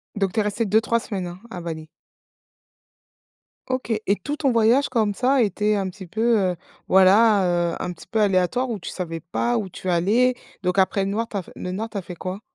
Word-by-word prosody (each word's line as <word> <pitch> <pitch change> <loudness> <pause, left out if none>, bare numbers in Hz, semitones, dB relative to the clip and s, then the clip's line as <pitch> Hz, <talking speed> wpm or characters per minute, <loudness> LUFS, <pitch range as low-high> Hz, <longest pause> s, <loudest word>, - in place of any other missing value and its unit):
Donc 195 -3 -1
tu 220 - 0
es - - +3
restée 210 +2 -1
2-3 220 +3 +2
semaines, 195 -6 -4
hein, 175 +1 -9
à 180 -5 -7
Bali? 160 -2 -6 1.8
OK 255 -2 -2
et 200 - +3
tout 295 +1 -3
ton 275 -4 +1
voyage 235 +4 +3
comme 220 -5 +1
ça 260 +3 +2
était 210 +1 +1
un 195 -2 -1
petit 190 -1 -10
peu, 225 +3 +2
heu, 185 -2 +1 0.3
voilà, 195 +2 +5 0.3
heu, - - -4
un 180 - -3
petit - - -15
peu 225 - -1
aléatoire 205 +5 +2
où 220 -3 -3
tu - - -7
savais 165 -3 -5
pas 235 +9 -1
où 205 -4 -3
tu 185 - -9
allais? 210 +9 +3 0.3
Donc 180 +1 +1
après 195 +1 +2
le 195 - -2
noir, 225 +2 -1
tu 205 - -4
as 185 - -3
f - - -16
le 180 - -5
nord 220 +4 -4
tu 210 - -6
as - - -2
fait 180 0 -9
quoi? 185 +4 -6
205 Hz, 225 wpm, -23 LUFS, 185-230 Hz, 1.8 s, voilà